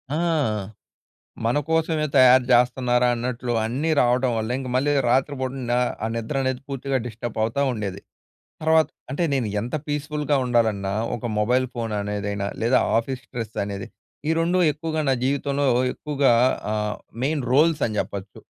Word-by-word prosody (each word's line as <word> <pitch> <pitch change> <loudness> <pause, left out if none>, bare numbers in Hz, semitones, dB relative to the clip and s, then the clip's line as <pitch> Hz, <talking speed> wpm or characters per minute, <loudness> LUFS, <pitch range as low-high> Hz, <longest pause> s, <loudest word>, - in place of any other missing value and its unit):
ఆ! - - 0 1.3
మనకోసవే 155 +5 +1
తయారు 130 -1 +7
జేస్తన్నారా! 125 0 +3
అన్నట్లు, 120 0 -3
అన్నీ 135 +8 -1
రావటం 125 +1 +2
వల్లే, 110 +3 -2
ఇంక 130 -1 -5
మళ్ళీ 145 +3 +2 0.2
రాత్రి 135 +3 +2
పూట 130 -1 -2 0.2
నా 120 - +3 0.3
ఆ - - +1
నిద్రనేది, 130 +2 -1
పూర్తిగా 135 0 -2
డిస్టబ్ 115 0 -6
అవుతా 115 +5 0
ఉండేది. 100 -4 -4 0.6
తర్వాత్ 160 0 +3 0.2
అంటే 145 +6 -1
నేను 130 -5 0
ఎంత 120 +5 -3
పీస్ఫుల్‌గా 150 0 -1
ఉండాలన్నా, 110 -5 +1 0.2
ఒక 120 - -7
మొబైల్ 125 +4 +2
ఫోన్ 115 -2 -3
అనేదిైనా, 100 -1 -3 0.2
లేదా 120 +3 +4 0.2
ఆఫీస్ 125 +2 -2
స్ట్రెస్ 115 -3 -6
అనేది, 100 -1 -5 0.4
ఈ - - +4
2 175 +2 +2
ఎక్కువగా 155 +1 -3
నా - - +4
జీవితంలో 140 +1 0 0.3
ఎక్కువగా 140 -4 +1 0.4
ఆహ్, 105 0 -1 0.3
మెయిన్ 145 -1 0
రోల్స్ 155 +3 +4
అని 110 -2 -3
జెప్పచ్చు. 100 0 -5
125 Hz, 140 wpm, -23 LUFS, 115-145 Hz, 1.3 s, తయారు